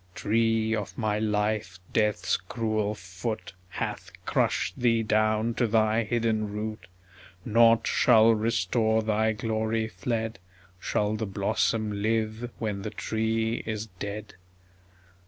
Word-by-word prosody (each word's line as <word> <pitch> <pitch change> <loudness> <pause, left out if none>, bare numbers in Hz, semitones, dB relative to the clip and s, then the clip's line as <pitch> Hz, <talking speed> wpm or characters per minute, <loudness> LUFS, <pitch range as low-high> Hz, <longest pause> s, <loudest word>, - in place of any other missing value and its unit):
Tree 115 +1 +1
of 105 -2 -5
my 105 -2 0
life, 105 -2 -1 0.2
Death's 105 -4 +2
cruel 110 +2 -2
foot 90 +3 -5 0.2
Hath - - -4 0.2
crushed - - 0
thee 115 -2 +3
down 110 +1 +2
to 120 0 +1
thy 110 +1 +2
hidden 110 -2 0
root; 110 +1 -5 0.6
Nought 115 0 +5
shall 115 -2 +5
restore 110 +1 +1
thy 110 0 +2
glory 110 0 -1
fled... 110 +2 -3 0.4
Shall 105 +3 0
the 110 0 -3
blossom 105 +1 0
live 110 +2 -1
when 105 -3 -3
the 105 - -4
tree 110 +1 -1
is 110 -1 -2
dead? 105 +1 -5
110 Hz, 120 wpm, -27 LUFS, 105-115 Hz, 0.6 s, Nought